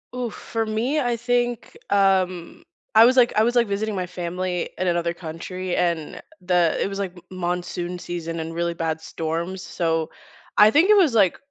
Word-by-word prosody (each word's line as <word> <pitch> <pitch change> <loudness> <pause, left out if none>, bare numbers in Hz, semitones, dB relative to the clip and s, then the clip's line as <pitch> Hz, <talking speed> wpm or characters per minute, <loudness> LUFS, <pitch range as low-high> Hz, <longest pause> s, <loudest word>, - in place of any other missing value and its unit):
Oof. 245 -3 -3
For 225 -1 -3
me, 235 +8 0
I 240 -3 0
think, 245 -1 -1
um, 190 - +1 0.3
I 225 - +9
was 255 +2 +4
like 240 -1 +5
I 215 - +4
was 240 +2 +1
like 235 -2 +4
visiting 205 +1 -2
my 180 -1 -2
family 180 0 -3
in 185 - 0
another 170 -1 0
country 175 +2 -5
and 170 -3 -1 0.2
the 180 -3 +2
it - - +1
was 195 - -5
like 195 -2 -3
m 175 - -13 0.2
monsoon 175 0 -3
season 165 -1 -5
and 160 +1 -5
really 170 0 -1
bad 160 -1 -3
storms. 165 +4 -4
So, 165 -3 -1 0.5
I 210 +1 +8
think 330 +7 +4
it 425 - +7
was 335 -10 +4
like 200 -6 +3
185 Hz, 190 wpm, -23 LUFS, 170-225 Hz, 0.5 s, I